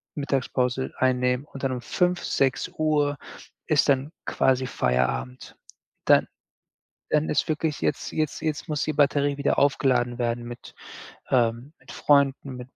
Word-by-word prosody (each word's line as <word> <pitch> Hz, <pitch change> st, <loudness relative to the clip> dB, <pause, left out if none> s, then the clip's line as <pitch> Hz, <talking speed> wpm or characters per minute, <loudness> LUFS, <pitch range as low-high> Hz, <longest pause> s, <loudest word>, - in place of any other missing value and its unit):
Mittagspause 130 Hz, -2 st, -1 dB
einnehmen 125 Hz, 0 st, +1 dB
und 135 Hz, -2 st, -11 dB
dann 135 Hz, -, +1 dB
um 125 Hz, -, -4 dB
5, 180 Hz, +6 st, 0 dB
6:00 145 Hz, +2 st, 0 dB, 0.5 s
ist -, -, +3 dB
dann 140 Hz, +2 st, +2 dB
quasi 130 Hz, 0 st, +1 dB
Feierabend. 65 Hz, -, -1 dB, 0.5 s
Dann -, -, +5 dB, 0.8 s
dann 150 Hz, 0 st, +2 dB
ist -, -, 0 dB
wirklich 155 Hz, -1 st, -1 dB
jetzt 145 Hz, -, -1 dB
jetzt 155 Hz, -2 st, -2 dB
jetzt 155 Hz, -1 st, -3 dB
muss 150 Hz, -2 st, -1 dB
die 155 Hz, -, -1 dB
Batterie 145 Hz, 0 st, +2 dB
wieder 140 Hz, -, 0 dB
aufgeladen 125 Hz, -3 st, +2 dB
werden 120 Hz, 0 st, -1 dB
mit, 120 Hz, 0 st, -10 dB, 0.6 s
ähm 120 Hz, +2 st, +1 dB
mit -, -, -13 dB
Freunden, 140 Hz, -2 st, +2 dB
mit 125 Hz, 0 st, -9 dB
135 Hz, 135 wpm, -25 LUFS, 125-145 Hz, 0.8 s, Dann